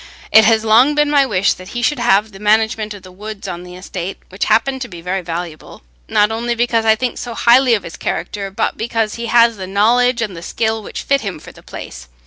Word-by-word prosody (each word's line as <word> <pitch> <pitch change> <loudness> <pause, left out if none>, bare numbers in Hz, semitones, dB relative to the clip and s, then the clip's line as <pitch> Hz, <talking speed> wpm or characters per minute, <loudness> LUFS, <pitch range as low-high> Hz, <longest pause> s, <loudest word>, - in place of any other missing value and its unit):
It 220 -1 +7
has 225 0 +3
long 245 +7 +5
been 295 0 +2
my 280 -2 +4
wish 195 -4 +2
that 185 +6 -10
he 240 - -2
should 295 -1 +1
have 215 -2 +2
the 195 - -13
management 215 0 +1
of 195 - -13
the 185 - -13
woods 210 +2 -8
on 175 0 -5
the 180 0 -11
estate, 185 0 -6
which 190 +2 -3
happen 265 +3 +1
to 250 - -5
be 175 -5 -10
very 180 +3 -3
valuable, 165 - -7 0.3
not 210 +1 +3
only 235 +2 -2
because 230 -1 +1
I 220 0 +5
think 245 +1 -3
so 235 -2 -6
highly 245 +1 +5
of 205 - -4
his 170 - -9
character, 200 -1 -4
but 195 - -2
because 225 -1 -1
he 235 0 -5
has 230 -1 +4
the 190 -1 -6
knowledge 235 +5 +2
and 200 -5 -5
the 165 - -8
skill 220 +4 -2
which - - -7
fit 275 0 +1
him 200 -4 -5
for - - -12
the - - -17
place. 60 +1 -10
220 Hz, 240 wpm, -17 LUFS, 190-235 Hz, 0.3 s, It